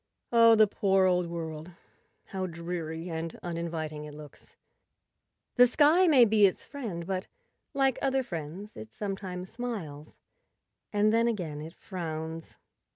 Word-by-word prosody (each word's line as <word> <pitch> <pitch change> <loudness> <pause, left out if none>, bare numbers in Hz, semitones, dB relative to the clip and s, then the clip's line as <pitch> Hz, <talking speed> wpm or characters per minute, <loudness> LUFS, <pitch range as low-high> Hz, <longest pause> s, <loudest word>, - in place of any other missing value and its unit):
Oh, 230 -1 +7
the 215 0 +7
poor 195 -2 +2
old 180 -1 +2
world; 165 0 -6 0.6
how 190 -1 -3
dreary 170 -1 -5
and 165 0 -4
uninviting 165 -3 -4
it 150 -1 -10
looks! 150 -1 -13 1.0
The 245 0 +8
sky 310 +8 +5
may 270 -7 +7
be 210 -2 +5
its 185 - -4
friend, 215 - -6
but, 190 +1 -3 0.5
like 270 -2 +2
other 270 -1 +1
friends, 175 +2 -7
it 220 - -9
sometimes 190 -3 -5
smiles 200 -12 -6 0.8
and 210 +1 +3
then 230 +1 +3
again 170 -10 -3
it 160 +2 -9
frowns. 160 -3 -6
185 Hz, 135 wpm, -29 LUFS, 160-220 Hz, 1.0 s, The